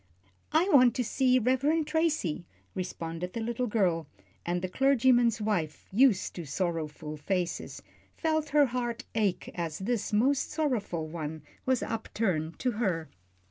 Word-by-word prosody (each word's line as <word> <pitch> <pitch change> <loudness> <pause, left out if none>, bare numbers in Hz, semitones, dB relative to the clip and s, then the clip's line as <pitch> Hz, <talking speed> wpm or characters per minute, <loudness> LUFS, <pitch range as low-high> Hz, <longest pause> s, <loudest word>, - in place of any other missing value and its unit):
"I 320 +4 +3
want 255 -8 +6
to 250 - 0
see 255 +2 +3
the 240 - -1
Reverend 295 +5 +2
Tracy," 305 - 0 0.3
responded 180 -1 -4
the 230 - -3
little 235 +2 -1
girl, 180 -8 +1 0.4
and 175 +1 -2
the - - 0
clergyman's 245 0 +3
wife, 180 -8 -2
used 225 -2 +3
to 175 - -4
sorrowful 155 -1 -3
faces, 175 +2 -3 0.3
felt 315 -2 0
her 290 0 +5
heart 240 -1 -3
ache 210 -5 0
as 165 -3 -3
this 225 +3 -2
most 260 +7 +2
sorrowful 235 - -1
one 155 -1 -5 0.2
was 260 -2 +2
upturned 185 -8 -2
to 255 - 0
her. 165 -7 0
220 Hz, 140 wpm, -29 LUFS, 170-260 Hz, 0.4 s, want